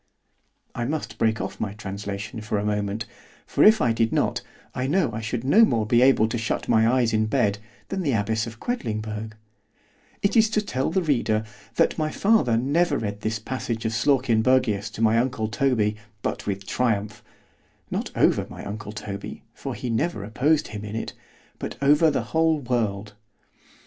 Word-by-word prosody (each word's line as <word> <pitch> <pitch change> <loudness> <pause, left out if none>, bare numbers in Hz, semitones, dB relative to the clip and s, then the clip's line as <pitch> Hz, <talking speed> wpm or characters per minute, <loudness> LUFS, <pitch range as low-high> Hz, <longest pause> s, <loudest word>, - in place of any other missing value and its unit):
_ - - -3
[——I - - 0
must 125 -6 -4
break 110 -1 +2
off - - -5
my 100 -2 -2
translation 100 +1 -6
for 105 0 -2
a 100 - -1
moment; 105 +1 -1 0.4
for - - +2
if 220 0 +7
I 115 - +3
did 115 0 +1
not, - - 0 0.3
I 130 +1 -2
know 155 -3 +2
I 110 - -4
should 115 +2 -3
no 195 - +6
more 115 - +2
be 120 +3 +3
able 130 -4 +5
to 120 - -2
shut 110 - -2
my 110 0 +4
eyes 125 -3 +2
in 110 0 +2
bed, 100 -1 +1 0.3
than 195 -1 -2
the 145 -7 0
abbess 110 +2 0
of 115 0 -9
Quedlingberg——It 110 - -5
is 220 -1 +5
to 215 -1 +1
tell 130 -9 -1
the 185 +3 0
reader; 115 -8 +1 0.3
that - - +2
my 155 0 0
father 195 - +3
never 145 +5 +2
read 105 -1 -4
this 110 +1 -1
passage 115 0 -4
of 110 - +1
Slawkenbergius 120 -3 +2
to 115 - -2
my 110 +1 +4
uncle 125 -3 -1
Toby, 110 -2 +1 0.3
but - - -3
with 100 -1 -3
triumph——not 105 -3 -4
over - - +3
my - - -9
uncle 105 0 -6
Toby, 105 -2 -7
for - - -6
he 125 - -4
never 115 0 -1
opposed 140 +9 +1
him 105 -1 -6
in 105 0 -6
it——but 115 - -8
over 150 +3 +5
the 145 - 0
whole 160 0 +3
world. 110 -5 -2
115 Hz, 175 wpm, -24 LUFS, 105-135 Hz, 0.4 s, if